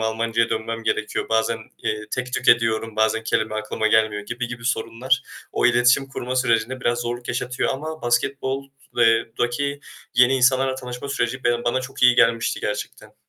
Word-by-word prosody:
Almancaya 115 +1 0
dönmem 115 +1 -3
gerekiyor. 110 - -2
Bazen, 110 0 +1 0.2
eee, 105 - -1
tek 125 -1 -3
tük - - -1
ediyorum, 115 -1 +3
bazen 110 +1 +2
kelime 110 -1 -1
aklıma 110 0 -2
gelmiyor 110 -1 +2
gibi 120 +3 -4
gibi 120 -1 -8
sorunlar 125 +2 0 0.3
o - - +2
iletişim 125 +3 +4
kurma 130 -1 -4
sürecinde 125 0 +1
biraz 120 -1 0
zorluk 120 +1 -4
yaşatıyor 125 +1 -1
ama 155 +4 -6
basketbol 135 +3 0 0.3
eee, 115 -1 +5
daki 140 +4 -1 0.3
yeni 125 +2 +5
insanlarla 130 +1 +3
tanışma 125 +1 -7
süreci 130 -2 -2
be 120 0 +1
bana 120 +2 +1
çok 130 0 -7
iyi 125 0 +7
gelmişti 115 -1 +2
gerçekten. 105 0 -5
120 Hz, 165 wpm, -22 LUFS, 115-130 Hz, 0.3 s, iyi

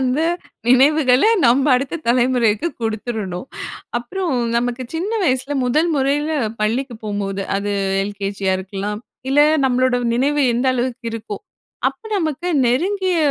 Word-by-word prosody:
அந்த 260 +3 +1 0.5
நினைவுகள 265 0 +5 0.2
நம்ப 265 +4 +4
அடுத்த 275 +6 -1
தலைமுறைக்கு 245 +2 +2
கொடுத்துறணும். 220 -2 -3 0.5
அப்பறம் 325 +3 -3 0.2
நமக்கு 245 +1 -1
சின்ன 365 +6 -2
வயசுல 265 0 0
முதல் 300 +7 +2
முறையில 285 +3 +1 0.3
பள்ளிக்கு 235 +3 -1
போகும்போது, 200 -1 -3
அது 205 +1 -2 0.3
எல்கேஜியா 200 -1 -2
இருக்கலாம். 200 +2 -4 0.3
இல்ல 290 - +4 0.2
நம்மளோட 255 -1 +2 0.2
நினைவு 285 +4 +2
எந்த 250 +3 0
அளவுக்கு 245 -1 -3
இருக்கும். 215 - -6 0.5
அப்ப - - -13
நமக்கு 320 -1 -2 0.2
நெருங்கிய 365 +8 +1
250 Hz, 115 wpm, -20 LUFS, 215-285 Hz, 0.5 s, நினைவுகள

